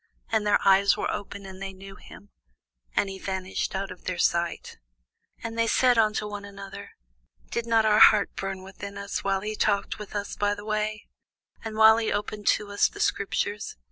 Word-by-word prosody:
And 220 -2 +1
their 205 - +5
eyes 195 +1 +5
were - - -1
opened, 200 -1 -6
and 190 0 -10
they 195 0 -5
knew 195 +1 -11
him; 205 0 -15 0.6
and - - +2
he 195 0 -7
vanished 190 0 -3
out 195 0 -3
of 185 - -12
their 185 -1 -2
sight. 170 -1 -1 0.6
And 230 0 -5
they 230 - +3
said 250 0 +4
one 215 -1 +4
to 210 -1 -3
another, 200 0 -9 0.6
Did 235 0 -2
not 225 -1 +3
our 215 0 +4
heart 210 -2 +6
burn 195 -1 -4
within 200 +1 -9
us, 200 0 -4
while 195 -1 0
he 215 +1 -4
talked 205 -1 0
with 210 0 -9
us 205 0 -3
by 205 0 0
the 205 0 -10
way, 215 0 -2 0.6
and 220 -1 -5
while 220 0 +8
he 225 -1 0
opened 205 0 -3
to 205 -1 +2
us 205 - +3
the 410 - -12
scriptures? 210 - -1
205 Hz, 195 wpm, -26 LUFS, 195-215 Hz, 0.6 s, while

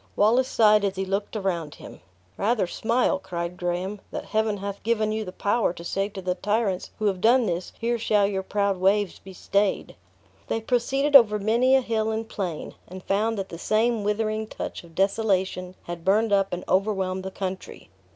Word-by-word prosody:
Wallace 240 +5 +3
sighed 215 -3 +4
as 200 -1 0
he 190 0 -2
looked 195 +3 -3
around 175 -7 -2
him. - - -12 0.4
"Rather 215 0 +1
smile," 230 +4 0
cried 175 -2 -5
Graham, 180 +3 -3
"that - - -5
Heaven 220 -1 0
hath 200 0 -6
given 220 -1 0
you 220 0 -2
the 185 - -7
power 205 0 0
to 170 - -10
say 195 +3 -1
to 195 -2 -8
the 180 0 0
tyrants 205 0 -1
who 215 - -3
have 190 -3 0
done 240 +3 +5
this, 180 -2 -3
'Here 235 0 0
shall 210 -2 +3
your 195 -1 -1
proud 200 0 0
waves 195 +1 +1
be 195 - -12
stayed!'" 200 +2 -1 0.5
They 225 - -1
proceeded 265 +5 +1
over 220 -5 +8
many 235 +6 +3
a 265 - +4
hill 220 -2 -1
and 220 0 -3
plain, 180 -8 -5
and 185 +1 -10
found 215 +3 0
that 195 -1 -4
the 170 - -8
same 220 +2 +1
withering 215 +1 -1
touch - - -6
of 165 -1 -17
desolation 190 -2 0
had 170 -1 -7
burned 205 +3 +2
up 195 -1 +2
and 180 0 -4
overwhelmed 190 -1 0
the 190 - -5
country. 190 -1 -6
200 Hz, 190 wpm, -25 LUFS, 190-220 Hz, 0.5 s, over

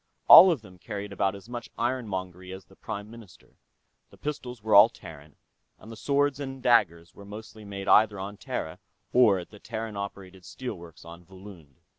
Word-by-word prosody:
All 185 +3 +11
of 150 -10 -1
them 95 -3 -16
carried 100 0 -7
about 95 0 -1
as 100 +2 -13
much 120 0 -7
ironmongery 95 -7 -4
as 95 0 -10
the 95 - -21
Prime 105 +2 -7
Minister 115 -7 -16 0.5
the - - -19
pistols 125 -6 -6
were 110 -1 -1
all 100 +3 +9
Terran, 75 -6 -13 0.4
and 110 - -14
the - - -9
swords 145 +3 0
and 135 -2 -6
daggers 90 -9 +2
were 100 - -14
mostly 110 +1 -11
made 100 -1 -7
either 105 -2 +4
on 100 +2 -7
Terra 80 - -6 0.3
or 115 -6 +5
at 90 - -9
the 105 - -14
Terran 110 -1 -6
operated 95 -2 -8
steel 125 +4 -7
works 85 -4 -14
on 85 +1 -12
Volund. 90 -6 -14
100 Hz, 185 wpm, -27 LUFS, 95-115 Hz, 0.5 s, All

